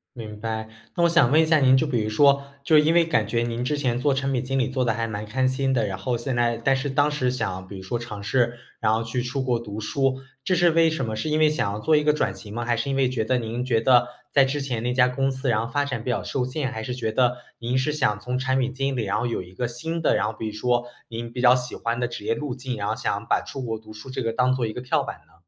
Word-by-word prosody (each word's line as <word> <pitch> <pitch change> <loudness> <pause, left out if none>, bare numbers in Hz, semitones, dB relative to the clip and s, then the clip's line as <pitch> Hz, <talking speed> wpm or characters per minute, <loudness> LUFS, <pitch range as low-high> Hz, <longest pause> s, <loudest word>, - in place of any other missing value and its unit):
明 110 -3 -8
白。 110 0 -4 0.3
那 175 - 0
我 - - +5
想 165 -7 +4
问 160 - +6
一 - - +2
下 160 -1 +4
您， 130 -1 +5
就 155 - +2
比 120 -6 0
如 110 - -2
说， 140 +4 +4 0.2
就 155 +2 +4
因 155 +2 +4
为 170 0 +5
感 115 -9 +1
觉 115 +1 0
您 120 +1 -2
之 150 +2 -1
前 125 -4 0
做 140 +2 +2
产 135 0 -1
品 125 -2 -1
经 135 +1 -1
理 130 - +1
做 130 -1 0
得 115 - +2
还 115 +1 -2
蛮 105 0 -4
开 130 +4 0
心 135 0 0
的， 115 -4 +1
然 95 -1 -3
后 120 +5 -2
现 120 +1 -3
在 120 -1 +1
但 135 +3 +2
是 135 +1 -2
当 145 +2 +2
时 135 -4 0
想 95 -7 -3
比 100 - -9
如 - - -9
说 115 +5 -3
尝 110 -4 -7
试， 120 +3 +1 0.2
然 110 -1 +2
后 110 +1 +1
去 120 +2 -2
出 130 +2 -2
国 125 -2 +1
读 110 -2 -7
书， 135 +3 0 0.2
这 185 - +2
是 175 -1 +4
为 165 0 +4
什 135 -6 -2
么？ 110 -1 -3
是 155 +8 -2
因 155 - +2
为 155 -1 +5
想 150 -9 0
要 105 - -4
做 155 +6 +3
一 150 - +2
个 150 - +4
转 150 - 0
型 105 -1 -10
吗？ 120 +1 -3
还 120 -1 +1
是 125 +5 -2
因 135 - 0
为 130 -2 +3
觉 120 -4 -1
得 125 +2 +1
您 120 +2 -3
觉 115 -3 +2
得 120 0 +5 0.2
在 140 -1 +5
之 140 +2 -1
前 125 -5 -2
那 125 +1 0
家 125 0 +4
公 135 +2 0
司 130 0 -2
然 115 0 +1
后 - - -10
发 145 -1 +1
展 130 -5 -4
比 125 - -1
较 - - 0
受 125 - -2
限， 130 +1 -2
还 110 -3 -5
是 125 +2 -4
觉 115 -3 -2
得 125 +1 +2 0.2
您 120 +2 -1
是 130 +4 +1
想 125 -9 0
从 125 +4 -2
产 130 0 +1
品 130 0 -1
经 135 0 -1
理， 120 -4 -1
然 100 - 0
后 120 - -1
有 115 - -2
一 90 +1 -14
个 125 - -1
新 160 +8 -4
的 - - +3
然 100 - +1
后 110 - -3
比 110 - -5
如 110 - -4
说 120 +2 0 0.2
您 115 0 -6
比 125 - -5
较 125 0 +7
喜 125 -1 -3
欢 115 +1 -2
的 125 - 0
职 120 -3 -7
业 115 - +1
路 145 -3 -4
径， 130 -2 -5
然 100 -1 -3
后 - - 0
想 - - -2
把 - - +2
出 135 - -7
国 115 -2 -3
读 110 0 -13
书 110 +5 -10
这 130 - -3
个 115 0 -2
当 125 +1 +3
做 125 -3 0
一 110 - -5
个 125 - -5
跳 125 - +1
板 - - -6
呢？ 80 - -27
125 Hz, 340 characters per minute, -24 LUFS, 115-135 Hz, 0.3 s, 较